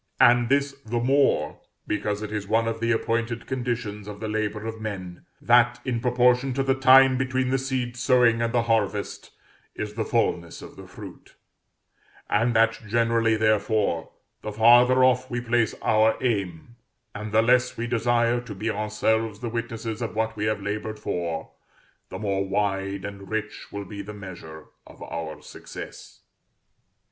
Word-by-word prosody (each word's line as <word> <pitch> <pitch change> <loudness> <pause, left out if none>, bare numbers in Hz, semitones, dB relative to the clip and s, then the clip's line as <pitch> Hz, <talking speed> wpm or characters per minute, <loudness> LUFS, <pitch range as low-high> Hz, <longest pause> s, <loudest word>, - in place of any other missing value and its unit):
And 120 0 +5
this 140 +1 +2
the 120 +2 -2
more, 125 - +2 0.3
because 105 0 -2
it 105 - -6
is 105 -2 -4
one 115 +2 +2
of 115 0 -2
the 115 +1 0
appointed 115 +1 -1
conditions 120 -5 -4
of 105 -1 -8
the 110 - -4
labor 105 0 -2
of 110 0 -6
men 95 -5 -6
that, 120 0 +4
in 125 -3 -1
proportion 125 +2 +2
to 135 - +1
the 135 0 +2
time 130 0 +6
between 130 0 0
the 135 - +2
seed 130 -2 -3
sowing 120 -2 +3
and 115 0 0
the 120 -1 +2
harvest, 105 -3 -1 0.5
is 105 0 -5
the 110 +1 -2
fulness 90 -8 -1
of - - -11
the - - -12
fruit; - - -12 1.0
and 115 +3 +2
that 115 0 +3
generally, 115 0 +2
therefore, 110 -5 +1 0.3
the 105 - -5
farther 120 +4 +6
off 130 0 +3
we 120 - -2
place 120 -2 0
our 110 +1 +3
aim, 100 -3 -3 0.4
and 105 0 -6
the 110 +1 +4
less 125 +2 +2
we 115 - -2
desire 120 0 +1
to 115 -4 -9
be 110 +4 -2
ourselves 105 0 -1
the 120 -1 -4
witnesses 115 -1 -4
of 115 -2 -4
what 110 0 -1
we 105 0 -2
have 110 -2 -1
labored 105 +1 -4
for, 85 -5 -4 0.6
the - - -6
more 100 -2 -1
wide 100 0 -2
and 100 -1 -8
rich 110 -1 -5
will 100 0 -5
be 100 +1 -7
the 105 +1 -9
measure 85 -6 -10 0.2
of - - -16
our 80 -2 -6
success. - - -10
115 Hz, 165 wpm, -25 LUFS, 105-120 Hz, 1.0 s, time